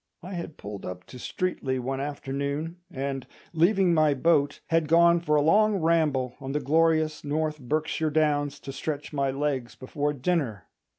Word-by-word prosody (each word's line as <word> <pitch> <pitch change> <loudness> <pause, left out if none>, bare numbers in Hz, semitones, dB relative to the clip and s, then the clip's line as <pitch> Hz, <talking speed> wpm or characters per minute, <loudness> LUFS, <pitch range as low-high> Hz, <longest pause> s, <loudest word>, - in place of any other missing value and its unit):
I 185 +2 -7
had 170 -3 -6
pulled 100 -1 -8
up 90 0 -6
to 125 - -12
Streatley 135 -1 -2
one 135 +2 -3
afternoon, 140 +3 -3
and, 135 -1 -4 0.3
leaving 180 +2 +3
my 155 -3 +4
boat, 145 -1 +2
had 165 -1 +2
gone 170 +2 +5
for 150 -3 +1
a 145 - +4
long 210 +6 +4
ramble 155 -7 +1
on 135 0 -4
the 150 - +1
glorious 155 +2 +2
North 155 +1 -1
Berkshire 155 +4 -1
Downs 145 -2 +1
to 135 - -6
stretch 145 +2 -4
my 140 -2 +1
legs 135 -4 -2
before 145 +3 -2
dinner. 135 - -1
150 Hz, 165 wpm, -27 LUFS, 135-165 Hz, 0.3 s, gone